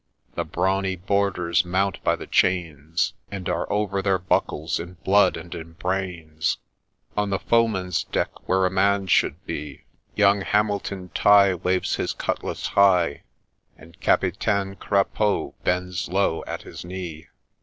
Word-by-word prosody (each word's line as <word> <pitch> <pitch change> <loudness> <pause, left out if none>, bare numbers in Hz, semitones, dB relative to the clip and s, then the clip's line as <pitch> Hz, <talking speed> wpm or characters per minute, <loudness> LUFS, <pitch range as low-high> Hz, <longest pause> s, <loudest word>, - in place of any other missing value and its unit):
— - - -41
The - - -2
brawny 95 +1 0
boarders 90 -2 +1
mount 95 +2 -1
by - - +3
the - - -8
chains, 80 -3 0 0.2
And 95 -3 -5
are - - -2
over 100 -2 0
their 95 -1 +2
buckles 85 -3 -1
in 85 +2 -7
blood 100 +2 +4
and 85 +1 -8
in 80 0 -8
brains: 85 -3 -2 0.6
On 105 -1 0
the 100 - +1
foeman's 100 -7 +1
deck, - - -3
where 95 0 +3
a 90 - +1
man 100 +1 +2
should 90 - +1
be, 75 -2 -6 0.3
Young 100 -1 +4
Hamilton 100 -2 -1
Tighe 100 -2 +6
Waves 90 0 +1
his - - -1
cutlass - - -3
high, 90 -7 +3 0.6
And 85 0 -17
Capitaine 100 -2 +1
Crapaud 100 +1 0
bends 90 0 -1
low 95 -3 +1
at - - -5
his - - -9
knee. 90 -3 -7
95 Hz, 145 wpm, -24 LUFS, 85-100 Hz, 0.6 s, Tighe